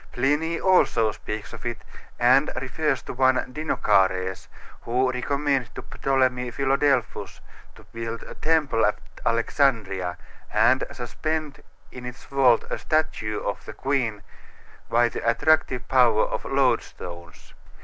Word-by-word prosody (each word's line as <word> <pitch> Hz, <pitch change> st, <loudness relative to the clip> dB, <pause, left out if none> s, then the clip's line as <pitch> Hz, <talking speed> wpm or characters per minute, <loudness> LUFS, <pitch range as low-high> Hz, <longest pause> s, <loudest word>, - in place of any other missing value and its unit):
Pliny 150 Hz, +6 st, +1 dB
also 150 Hz, -, +3 dB
speaks 105 Hz, +1 st, -7 dB
of -, -, -9 dB
it, 120 Hz, -1 st, -4 dB, 0.4 s
and 130 Hz, +5 st, +4 dB
refers 135 Hz, +1 st, -1 dB
to -, -, -7 dB
one 130 Hz, +1 st, +3 dB, 0.2 s
Dinocares, 95 Hz, -, +1 dB, 0.3 s
who 125 Hz, +2 st, +1 dB
recommended 135 Hz, 0 st, -1 dB
to -, -, -7 dB
Ptolemy 130 Hz, -2 st, 0 dB
Philadelphus 135 Hz, 0 st, 0 dB, 0.4 s
to -, -, -16 dB
build 115 Hz, 0 st, -5 dB
a -, -, -10 dB
temple 150 Hz, -7 st, +1 dB
at 105 Hz, -, +2 dB, 0.3 s
Alexandria 115 Hz, -, +1 dB, 0.3 s
and 130 Hz, +1 st, +4 dB
suspend 150 Hz, +4 st, -4 dB, 0.3 s
in 125 Hz, -1 st, -8 dB
its 125 Hz, +1 st, -9 dB
vault 130 Hz, -4 st, +3 dB
a -, -, -2 dB
statue 150 Hz, -9 st, -1 dB
of 100 Hz, -, -4 dB
the -, -, -8 dB
queen 120 Hz, -7 st, -1 dB, 0.7 s
by 120 Hz, +1 st, +4 dB
the -, -, -5 dB
attractive 130 Hz, -1 st, +2 dB
power 120 Hz, -4 st, +4 dB
of -, -, -4 dB
"loadstones." 85 Hz, -2 st, -2 dB
125 Hz, 125 wpm, -24 LUFS, 115-140 Hz, 0.7 s, and